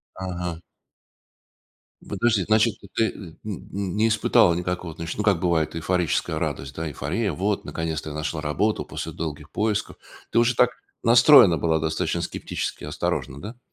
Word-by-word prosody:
Ага. 90 -3 -4 1.5
Подожди, 115 -5 +1
значит, 110 +1 +3
то - - -13
ты, 115 - +3
э, - - -2
м, 85 -5 -11
м, 100 -2 -5
не 110 +2 +3
испытала 105 -5 +4
никакого, 90 -1 -3
значит, 80 +1 -5
ну 105 - -1
как 100 -6 +3
бывает 85 -3 +1
эйфорическая 85 -1 0
радость, 70 +1 -3
да? 80 0 -3
Эйфория: 85 +9 -2
вот 100 +6 -1
наконец-то 80 -1 -4
я - - -6
нашла 75 +1 -3
работу 95 +8 0
после - - -5
долгих 75 -2 -6
поисков. 105 -1 -1 0.3
Ты - - +2
уже 120 +1 +4
так 125 +1 +4 0.3
настроена 115 - +7
была 80 0 +1
достаточно 80 0 -1
скептически, - - -4
осторожно, 70 +2 -3
да? 115 +4 -8
90 Hz, 155 wpm, -24 LUFS, 80-105 Hz, 1.5 s, настроена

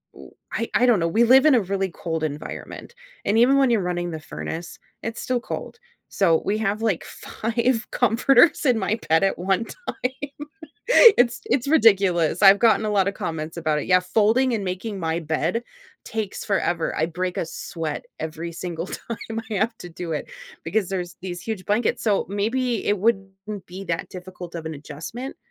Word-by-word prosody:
oh, - - -13 0.2
I 230 - -2
I 250 - +4
don't 235 -6 +4
know, 165 - +1
we 225 +8 +3
live 265 +4 +6
in 295 -4 +6
a 230 - +4
really 195 0 -1
cold 165 -2 -4
environment, 150 -1 -6 0.3
and 210 +2 +2
even 260 +4 +5
when 270 -2 +4
you're 230 -3 +3
running 175 -1 -2
the 160 - -5
furnace, 165 +3 -6 0.3
it's 225 +1 -4
still 255 -1 0
cold. 455 - -6 0.3
So 165 -5 +3
we 210 +2 +1
have, 215 0 -1
like, 215 -7 0
five 235 +1 -2
comforters 255 +8 +4
in 250 -4 +4
my 215 +4 -1
bed 160 +3 +4
at 195 - +1
one 190 +4 +1
time, 285 - -6 0.7
it's 240 -1 +3
it's 265 +1 0
ridiculous, 195 - +4
I've 195 0 +8
gotten 220 -2 +4
a - - 0
lot 195 -2 +2
of - - -1
comments 160 -1 -4
about 155 -2 0
it; - - -5
yeah, 185 0 +5
folding 225 +7 +2
and 205 - -2
making 190 +3 -4
my 165 0 -1
bed 160 +8 -1 0.4
takes 220 -3 -4
forever, 175 -4 0
I 160 - +2
break 180 +2 -3
a - - 0
sweat 165 -2 -5 0.2
every 160 +2 -5
single 170 0 -5
time 230 +2 -6 0.3
I 215 - -2
have 220 +3 0
to 175 - -9
do 165 0 -5
it 150 - -4 0.4
because 190 +2 0
there's 180 -2 -4
these 175 -2 -5
huge 215 -5 -5
blankets, 215 +3 +1
so 205 -3 +2
maybe 235 +4 -1
it 205 -1 +2
wouldn't 195 -1 -2
be 190 +2 -8
that 165 -2 -3
difficult 180 -1 -9
of 160 - -6
an 160 - -4
adjustment 155 - -7
195 Hz, 190 wpm, -23 LUFS, 170-230 Hz, 0.7 s, I've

